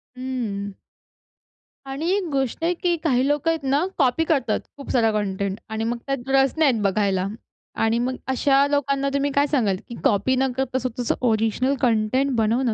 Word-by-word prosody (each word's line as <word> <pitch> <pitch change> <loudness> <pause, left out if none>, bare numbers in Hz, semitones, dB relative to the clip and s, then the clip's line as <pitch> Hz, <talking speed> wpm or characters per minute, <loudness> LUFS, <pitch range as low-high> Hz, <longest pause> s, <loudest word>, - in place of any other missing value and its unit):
हं. 225 -6 -4 1.1
आणि 275 +5 -3
एक 390 -2 0
गोष्ट 270 +1 -1
आहे 345 +2 +2
की 350 0 0
काही 260 -3 +2
लोकं 295 +2 +1
आहेत 325 -3 -3
ना 285 +6 +2
कॉपी 270 +2 +2
करतात 265 -9 +1 0.2
खूपसारं 245 -5 +1
कंटेंट 200 -1 -2
आणि 220 0 -3
मग 235 +2 -1
त्यात 270 -2 -3
रस 270 -1 +4
नाही 310 -4 +5
आहेत 225 -3 -2
बघायला. 195 -1 +1 0.5
आणि 225 +1 +1
मग 255 +2 -1
अशा 275 +1 +3
लोकांना 275 -1 0
तुम्ही 280 0 0
काय 280 +1 +2
सांगाल 230 -10 +1
की 235 - -8
कॉपी 210 +5 +2
न 265 0 +1
करता 260 -1 -1
स्वतःचं 250 -1 -2
ओरिजिनल 225 +4 +1
कंटेंट 245 +3 +2
बनवणं 230 +2 +1
255 Hz, 170 wpm, -23 LUFS, 225-280 Hz, 1.1 s, नाही